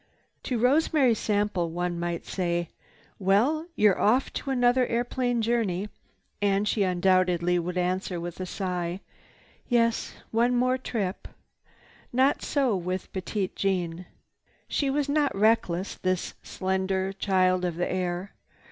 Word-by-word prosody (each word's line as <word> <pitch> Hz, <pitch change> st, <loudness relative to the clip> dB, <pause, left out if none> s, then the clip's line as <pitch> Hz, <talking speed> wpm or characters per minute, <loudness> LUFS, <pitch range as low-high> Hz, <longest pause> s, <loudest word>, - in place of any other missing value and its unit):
To 250 Hz, -, -1 dB
Rosemary 270 Hz, +1 st, +3 dB
Sample 205 Hz, -5 st, 0 dB
one 175 Hz, +1 st, -2 dB
might 170 Hz, 0 st, -3 dB
say, 175 Hz, -2 st, -1 dB, 0.5 s
"Well, 235 Hz, -, +2 dB
you're 210 Hz, -3 st, +3 dB
off 245 Hz, +6 st, +2 dB
to -, -, -4 dB
another 245 Hz, -1 st, +3 dB
airplane 245 Hz, 0 st, 0 dB
journey," 210 Hz, -4 st, 0 dB, 0.5 s
and 200 Hz, 0 st, +2 dB
she 210 Hz, -, +1 dB
undoubtedly 180 Hz, -1 st, +2 dB
would 180 Hz, +1 st, -3 dB
answer 180 Hz, 0 st, -1 dB
with 175 Hz, +1 st, -6 dB
a 185 Hz, -, -4 dB
sigh, 180 Hz, -1 st, -3 dB, 0.7 s
"Yes, 230 Hz, -2 st, +1 dB, 0.2 s
one 240 Hz, +2 st, +2 dB
more 255 Hz, +1 st, +2 dB
trip." 205 Hz, -7 st, -3 dB, 0.8 s
Not 260 Hz, +3 st, +3 dB
so 260 Hz, -9 st, +1 dB, 0.3 s
Petite 190 Hz, +1 st, -3 dB
Jeanne. 180 Hz, -3 st, -1 dB, 0.6 s
She 280 Hz, -, 0 dB
was 285 Hz, +1 st, 0 dB
not 285 Hz, -5 st, +1 dB
reckless, 195 Hz, -3 st, +2 dB
this 185 Hz, -1 st, -2 dB
slender 190 Hz, 0 st, -1 dB
child 185 Hz, -2 st, +2 dB
of 175 Hz, -2 st, -1 dB
the 175 Hz, +1 st, -1 dB
air. 180 Hz, +1 st, -3 dB
195 Hz, 125 wpm, -27 LUFS, 180-240 Hz, 0.8 s, Rosemary